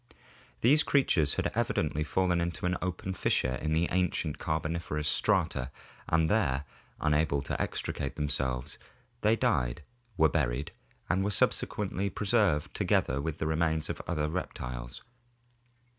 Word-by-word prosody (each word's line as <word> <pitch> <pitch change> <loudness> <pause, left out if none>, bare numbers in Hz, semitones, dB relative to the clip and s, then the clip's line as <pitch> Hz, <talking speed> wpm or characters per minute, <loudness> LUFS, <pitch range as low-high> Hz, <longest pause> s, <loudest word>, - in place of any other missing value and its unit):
These 145 +6 +6
crea 140 -3 +3
tures 75 -4 +2
had - - 0
evidently 75 - 0
fallen 90 +2 +1
into 85 0 -3
an 90 0 +1
open 90 +1 -3
fissure 65 -7 +1
in 75 - -1
the 85 +2 +2
ancient 90 -4 0
Car 80 0 0
boniferous 80 -2 -3
strata 65 -2 +1 0.4
and 80 0 +3
there, 75 -9 +1 0.4
unable 75 -2 +1
to - - -3
extricate 70 - -3
themselves, 70 -4 -2 0.4
they 110 +1 +4
died, 60 - 0 0.3
were 80 - +6
buried, 70 -3 -1 0.4
and 95 - +1
were 100 - 0
subsequently 100 -1 +1
preserved 100 -8 +1
together 65 +3 +1
with 80 +1 -3
the 80 - -2
remains 80 0 +1
of - - -6
other 75 -3 0
reptiles. 60 -8 -5
80 Hz, 140 wpm, -30 LUFS, 70-90 Hz, 0.4 s, These